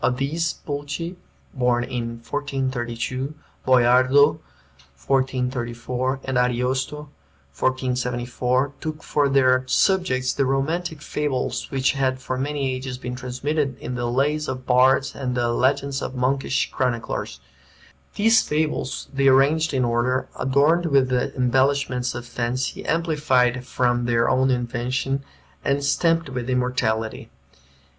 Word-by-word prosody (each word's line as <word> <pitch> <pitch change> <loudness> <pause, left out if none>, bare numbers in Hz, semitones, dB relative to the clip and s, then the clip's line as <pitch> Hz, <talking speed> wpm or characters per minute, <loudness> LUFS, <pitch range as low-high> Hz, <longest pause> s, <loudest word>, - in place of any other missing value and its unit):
Of 125 - +2
these, 160 +5 -1
Pulci 145 +4 -4 0.4
(born 125 -2 +1
in 115 -1 -4
1432), 130 -1 -3 0.3
Boiardo 130 +3 +5 0.6
(1434), 130 - -1
and 130 -1 0
Ariosto 130 +4 -1 0.5
(1474) 125 - -1
took 155 -1 -5
for 145 -1 +1
their 130 -2 +4
subjects 130 -7 +2
the 140 - +1
romantic 155 +4 -1
fables 130 -4 -2
which 135 -1 +1
had 130 -1 0
for 130 0 -4
many 140 -1 -1
ages 130 0 -5
been 125 -1 -6
transmitted 135 +3 -2
in 125 - -6
the 120 -1 -2
lays 145 +5 0
of 130 -1 -5
bards 130 +2 +4
and 125 -2 -3
the 120 -1 +1
legends 135 +3 +1
of 130 - -5
monkish 135 +1 0
chroniclers. 125 -3 -2 0.8
These 225 +2 +5
fables 150 -3 -2
they 135 0 +2
arranged 145 +5 +4
in 130 -3 +1
order, 120 +2 0
adorned 150 +6 +2
with 135 -4 +3
the 125 -1 0
embellishments 130 0 +1
of 120 0 -6
fancy, 120 +2 -3
amplified 140 -7 +1
from 120 -1 +1
their 115 -1 +2
own 130 +1 +3
invention, 125 +2 -1 0.4
and 140 +1 0
stamped 165 +3 +2
with 125 -1 -4
immortality. 125 -3 -1
130 Hz, 120 wpm, -23 LUFS, 125-140 Hz, 0.8 s, Boiardo